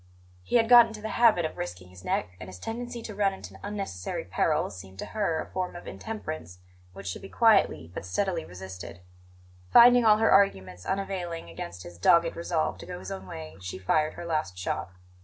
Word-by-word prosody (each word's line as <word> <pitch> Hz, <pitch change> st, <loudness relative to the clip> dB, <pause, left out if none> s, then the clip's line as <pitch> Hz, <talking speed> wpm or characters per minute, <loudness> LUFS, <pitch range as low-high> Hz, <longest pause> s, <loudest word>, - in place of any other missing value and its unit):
He 90 Hz, -, -3 dB
had 225 Hz, -1 st, +5 dB
got 240 Hz, -1 st, +9 dB
into 220 Hz, -1 st, -9 dB
the 220 Hz, +1 st, -5 dB
habit 220 Hz, -8 st, +4 dB
of 155 Hz, -, -5 dB
risking 90 Hz, +1 st, -6 dB
his 90 Hz, 0 st, -14 dB
neck, -, -, -1 dB
and 90 Hz, -, -8 dB
his 95 Hz, -, -9 dB
tendency 235 Hz, -, -5 dB
to 215 Hz, -, -6 dB
run 195 Hz, -1 st, +1 dB
into -, -, -11 dB
unnecessary 195 Hz, -, -4 dB
peril -, -, 0 dB
seemed 95 Hz, +1 st, -11 dB
to -, -, -5 dB
her 200 Hz, -7 st, 0 dB
a -, -, -4 dB
form 185 Hz, -1 st, -3 dB
of 175 Hz, -, -9 dB
intemperance 90 Hz, -, -6 dB, 0.4 s
which 100 Hz, +1 st, -10 dB
should 95 Hz, -, -4 dB
be 195 Hz, -, -10 dB
quietly 210 Hz, -, +3 dB
but -, -, -5 dB
steadily 90 Hz, -3 st, -1 dB
resisted. 90 Hz, 0 st, -9 dB, 0.7 s
Finding 245 Hz, +1 st, +8 dB
all 215 Hz, -1 st, +6 dB
her 225 Hz, +1 st, +3 dB
arguments 95 Hz, -, +2 dB
unavailing 180 Hz, -, -3 dB
against 85 Hz, +2 st, -7 dB
his 85 Hz, -1 st, -11 dB
dogged 170 Hz, -, +4 dB
resolve 170 Hz, -1 st, -1 dB
to -, -, -10 dB
go -, -, -6 dB
his 95 Hz, +1 st, -8 dB
own 95 Hz, -1 st, -6 dB
way, 80 Hz, 0 st, -8 dB
she 90 Hz, 0 st, -6 dB
fired 155 Hz, +12 st, +1 dB
her 175 Hz, -, -7 dB
last 155 Hz, -, -2 dB
shot. 90 Hz, 0 st, -3 dB
160 Hz, 200 wpm, -28 LUFS, -, 0.7 s, got